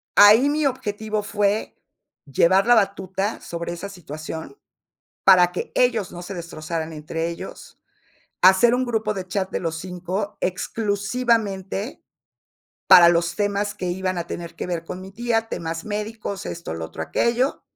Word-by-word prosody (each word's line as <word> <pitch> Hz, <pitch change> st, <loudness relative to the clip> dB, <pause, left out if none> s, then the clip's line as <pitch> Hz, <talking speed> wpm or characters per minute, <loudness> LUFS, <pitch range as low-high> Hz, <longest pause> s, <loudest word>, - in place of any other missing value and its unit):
ahí 215 Hz, +7 st, +8 dB
mi 300 Hz, +1 st, 0 dB
objetivo 215 Hz, -4 st, -2 dB
fue 205 Hz, 0 st, 0 dB, 0.5 s
llevar 170 Hz, +7 st, +3 dB
la 240 Hz, +1 st, +6 dB
batuta 195 Hz, 0 st, 0 dB
sobre 170 Hz, 0 st, -5 dB
esa 180 Hz, +4 st, -6 dB
situación, 160 Hz, -, -8 dB, 0.7 s
para 180 Hz, -2 st, +7 dB
que 180 Hz, -, -4 dB
ellos 230 Hz, -6 st, +2 dB
no 175 Hz, -, -7 dB
se 195 Hz, +3 st, -7 dB
destrozaran 165 Hz, -1 st, -5 dB
entre 160 Hz, +2 st, -3 dB
ellos, 170 Hz, -, -9 dB, 0.6 s
hacer 190 Hz, +6 st, +6 dB
un 255 Hz, +1 st, +1 dB
grupo 220 Hz, -3 st, 0 dB
de 185 Hz, -2 st, -6 dB
chat 190 Hz, 0 st, -2 dB
de -, -, -2 dB
los 165 Hz, -2 st, -3 dB
5, 185 Hz, +3 st, -4 dB
exclusivamente, 205 Hz, +1 st, -1 dB, 0.9 s
para 170 Hz, -1 st, +9 dB
los 170 Hz, 0 st, +1 dB
temas 205 Hz, 0 st, 0 dB
que 180 Hz, -, -4 dB
iban 185 Hz, +1 st, -2 dB
a 170 Hz, -, -4 dB
tener 170 Hz, -1 st, -6 dB
que -, -, -5 dB
ver 170 Hz, -2 st, -3 dB
con 180 Hz, -, -6 dB
mi 190 Hz, +1 st, -10 dB
tía, 225 Hz, +1 st, -1 dB
temas 165 Hz, 0 st, -4 dB
médicos, 210 Hz, -1 st, -4 dB
esto, 170 Hz, -, -5 dB
lo 80 Hz, 0 st, -4 dB
otro, 80 Hz, 0 st, -8 dB
aquello 235 Hz, -, 0 dB
195 Hz, 150 wpm, -23 LUFS, 170-215 Hz, 0.9 s, para